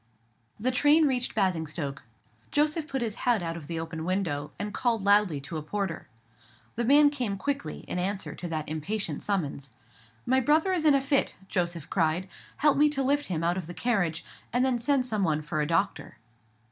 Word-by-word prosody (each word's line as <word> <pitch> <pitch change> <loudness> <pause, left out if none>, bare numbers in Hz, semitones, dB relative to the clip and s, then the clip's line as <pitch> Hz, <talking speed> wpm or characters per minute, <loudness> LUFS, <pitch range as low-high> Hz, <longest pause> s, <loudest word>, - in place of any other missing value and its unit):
The 250 +4 +1
train 295 +5 +5
reached 255 -3 0
Basingstoke; 160 -7 -1 0.5
Joseph 300 +1 +1
put 270 -4 -2
his 220 -1 -3
head 235 -7 +1
out 165 0 -3
of 160 -4 -8
the 165 0 -3
open 165 0 -5
window, 165 -5 -1
and 205 0 -4
called 230 -3 0
loudly 200 -6 +4
to 155 +4 -6
a - - -3
porter. 185 +2 -3 0.7
The 235 - -1
man 290 +4 +6
came 245 -9 -2
quickly, 280 +6 -3
in 180 - -4
answer 195 +2 -2
to 175 - -6
that 155 -2 -3
impatient 160 +1 -3
summons. 150 -9 -2 0.6
"My 260 +1 +3
brother 310 +8 +3
is 335 -4 0
in 295 -2 +6
a 275 - +3
fit," 275 0 +1
Joseph 175 -5 -2
cried; 170 +1 +1 0.3
"help 295 -2 +3
me 300 0 +6
to 275 -2 0
lift 285 +2 +1
him 165 -3 -2
out 175 +2 +1
of 180 -4 -5
the 175 - -8
carriage, 180 -9 0 0.3
and 245 +3 +2
then 255 -2 +1
send 270 +1 +2
some 215 -5 -1
one 155 -3 +1
for 150 0 -2
a 150 - 0
doctor." 165 -6 -1
200 Hz, 195 wpm, -28 LUFS, 165-265 Hz, 0.7 s, man